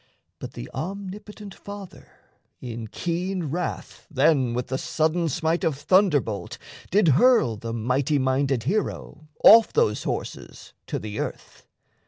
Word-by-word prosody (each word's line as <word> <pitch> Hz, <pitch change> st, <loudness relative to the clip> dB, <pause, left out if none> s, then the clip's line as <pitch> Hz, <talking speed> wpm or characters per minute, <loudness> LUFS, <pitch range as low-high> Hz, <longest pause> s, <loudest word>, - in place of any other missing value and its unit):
But -, -, -8 dB
the -, -, -7 dB
omnipotent 200 Hz, +3 st, -7 dB
Father 200 Hz, -2 st, -11 dB, 0.5 s
in 115 Hz, -2 st, -6 dB
keen 175 Hz, -, -3 dB
wrath 175 Hz, +2 st, -5 dB
Then 135 Hz, -5 st, +2 dB
with 125 Hz, 0 st, -3 dB
the 130 Hz, +1 st, -2 dB
sudden 160 Hz, +2 st, 0 dB
smite 160 Hz, +4 st, -1 dB
of 155 Hz, -4 st, 0 dB
thunderbolt 145 Hz, -, +1 dB, 0.3 s
Did 195 Hz, -2 st, +3 dB
hurl 165 Hz, -, +4 dB
the 115 Hz, +2 st, -6 dB
mighty 125 Hz, +6 st, 0 dB
minded 130 Hz, -2 st, +1 dB
hero 155 Hz, -, -3 dB, 0.2 s
off 225 Hz, +1 st, +8 dB
Those 105 Hz, -, +1 dB
horses -, -, -6 dB
to -, -, -2 dB
the 105 Hz, 0 st, -6 dB
earth. -, -, -7 dB
155 Hz, 130 wpm, -24 LUFS, 125-185 Hz, 0.5 s, off